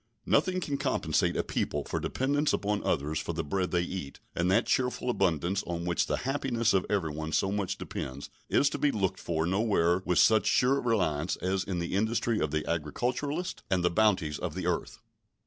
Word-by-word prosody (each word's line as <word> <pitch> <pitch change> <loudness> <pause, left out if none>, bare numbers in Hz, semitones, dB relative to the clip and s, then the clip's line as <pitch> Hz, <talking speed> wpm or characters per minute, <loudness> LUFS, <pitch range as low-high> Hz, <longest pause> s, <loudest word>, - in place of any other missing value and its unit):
Nothing 185 +5 +2
can 145 -6 -3
compensate - - +1
a - - +1
people 75 -1 -2
for - - -3
a - - -2
dependence 145 +3 0
upon 105 0 -1
others 75 +2 0
for - - -3
the - - -2
bread 90 +5 -1
they 85 -1 +1
eat, 90 -6 -6 0.2
and 85 +2 +1
that 110 +5 +3
cheerful 125 -1 0
abundance 95 -1 +1
on 85 0 -3
which 85 -1 +1
the - - +1
happiness 125 -4 +1
of 95 -2 +1
everyone 80 -6 -1
so 95 +5 +2
much 100 -2 -2
depends 65 +2 -6 0.2
is 140 - +4
to - - -4
be 145 - +3
looked 100 -8 -1
for 80 -1 -1
nowhere 95 -2 +2
with 90 -2 0
such 110 -1 +5
sure 135 +2 +3
reliance 90 -8 0
as 95 +1 -1
in 95 -2 -3
the 85 +1 -3
industry 110 +2 +1
of 80 - 0
the 75 +1 -2
agriculturist 125 - -2
and 90 -2 +1
the 90 - +3
bounties 95 -7 +2
of - - -4
the - - -3
earth. - - -2
95 Hz, 200 wpm, -29 LUFS, 85-120 Hz, 0.2 s, such